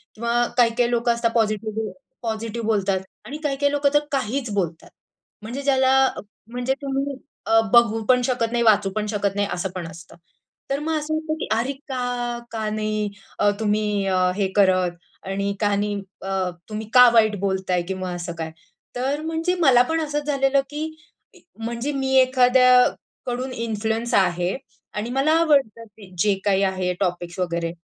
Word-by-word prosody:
किंवा 235 +2 +1
काही-काही 240 0 +3
लोकं 235 0 +2
असतात 235 -1 0
पॉझिटिव्ह 215 -1 -1 0.3
पॉझिटिव्ह 225 0 -3
बोलतात 200 -3 +1 0.3
आणि 275 +7 -6
काही-काही 285 0 +1
लोकं 290 -1 +2
तर 295 - +6
काहीच 260 -2 -1
बोलतात, 170 -5 -3 0.5
म्हणजे 240 +6 -5
ज्याला 265 -2 +3 0.6
म्हणजे 250 +2 -1
तुम्ही 275 0 -2 0.3
अ, 225 0 +5
बघू 225 -2 +5
पण 250 -1 +5
शकत 235 -3 0
नाही, 235 0 +1
वाचू 210 -3 +4
पण 215 - -1
शकत 205 -2 -1
नाही 205 0 0
असं 180 +2 -2
पण 175 -3 -4
असतं. 165 +2 -12 0.5
तर 275 +1 0
मग 315 +1 -1
असं 305 +1 -4
वाटतं 315 0 -2
की - - -3
"अरे 235 +5 0 0.2
का? 245 -2 -2
का 220 -1 -2
नाही? 215 -1 -1 0.3
अ, 205 - +4
तुम्ही 210 -1 0
अ, 185 -1 +1 0.2
हे 200 -2 +1
करत 185 -3 +3 0.3
आणि 200 +1 -1
का 205 -1 +2
नाही 205 0 -1 0.2
अ, 190 -1 -1 0.2
तुम्ही 215 0 -5
का 250 -1 +9
वाईट 220 -2 +4
बोलताय 190 -2 0
किंवा 185 -1 -3
असं 175 0 -5
काय?" 160 -1 -4 0.4
तर 270 +4 -1
म्हणजे 325 +3 -1
मला 260 -6 +6
पण 325 0 +1
असंच 295 -1 -2
झालेलं 275 -1 +2
की 300 +1 -4 0.7
म्हणजे 235 +5 -3
मी 265 -1 -1
एखाद्याकडून 255 0 +3
इन्फ्लुअन्स 225 0 -2
आहे 180 -1 +2 0.4
आणि 215 +3 -3
मला 270 +4 +2
आवडतं 275 -9 +2
की 205 -3 -16
जे 205 +3 +3
काही 195 -1 +3
आहे 185 -1 0
टॉपिक्स 175 -2 -2
वगैरे. 170 -2 -1
225 Hz, 160 wpm, -23 LUFS, 200-260 Hz, 0.7 s, का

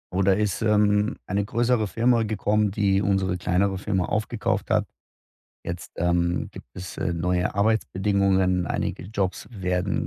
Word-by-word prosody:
Oh, 95 - +2
da 95 0 +4
ist, 105 -1 -1
ähm, 105 +1 +3
eine 100 +2 0
größere 115 +1 +1
Firma 115 +2 +2
gekommen, 105 -1 +1
die 100 0 +1
unsere 95 -2 +1
kleinere 95 +2 0
Firma 95 -3 0
aufgekauft 110 +1 -1
hat. - - +2 0.8
Jetzt, 85 0 -6
ähm, 85 0 0
gibt - - -11
es, 90 0 -8
äh, 85 - -1
neue 90 +2 0
Arbeitsbedingungen, 100 -3 +1
einige - - -2
Jobs 95 -1 -3
werden 90 -5 -1
100 Hz, 145 wpm, -25 LUFS, 90-105 Hz, 0.8 s, da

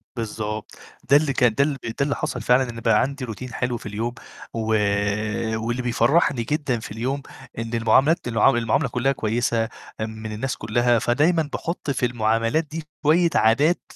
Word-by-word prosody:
بالضبط، 110 -2 -4 0.4
ده 140 - +8
اللي 150 -2 0
كان 125 -3 +3
ده 140 - +4
ب 140 -1 -1
ده 115 -1 -4
اللي 140 +1 +1
حصل 150 -5 -3
فعلًا 125 +3 +3
إن 115 -1 -7
بقى 105 -1 +3
عندي 140 0 -2
روتين 120 +2 -7
حلو 120 +1 -1
في - - -13
اليوم، 110 +3 -3 0.4
و 115 - -3 1.0
واللي 120 +2 -2
بيفرّحني 125 +2 +2
جدًا 140 -2 -1
في 110 - -9
اليوم 130 +6 -2 0.4
إن 115 0 -4
المعاملات 120 +7 +3
المعام 115 +3 +3
المعاملة 120 +2 +1
كلّها 125 +3 +1
كويسة، 115 -1 0 0.3
آمم 110 0 -5
من 110 - -5
الناس 115 +5 -3
كلّها 120 +2 +2
فدايمًا 150 +7 +2
باحُط 170 -3 -4
في 125 -1 0
المعاملات 115 +5 +1
دي 165 +1 -5 0.2
شوية 170 +3 +4
عادات 140 +10 +3
120 Hz, 170 wpm, -23 LUFS, 115-140 Hz, 1.0 s, ده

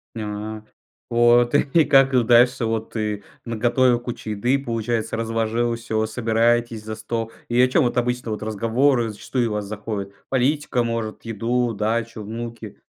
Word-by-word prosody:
Нят 105 0 -5 0.5
Вот. 120 +1 +4
И 150 +2 +3
как 135 -3 +4
дальше 120 +1 +4
вот 110 0 -2
ты 105 -2 -2 0.2
наготовил 120 +2 +2
кучу 120 -3 -6
еды, 120 +6 +1
получается 115 -2 -2
разложил 115 +1 0
всё, 110 -2 -2
собираетесь 115 0 +1
за 110 0 -5
стол 115 +1 -4 0.2
и 120 +1 +1
о 125 - +6
чем 135 +4 +3
вот 120 - -1
обычно, 125 -1 -1
вот 105 - -4
разговоры 115 +3 +1
зачастую 115 +3 -2
у - - -2
вас 105 -1 -2
заходит, 100 -1 -5 0.2
политика 135 -1 +1
может 115 -2 -3
еду, 115 +2 -1
дачу, 110 +1 -2
внуки? 115 0 -7
115 Hz, 150 wpm, -22 LUFS, 110-120 Hz, 0.5 s, о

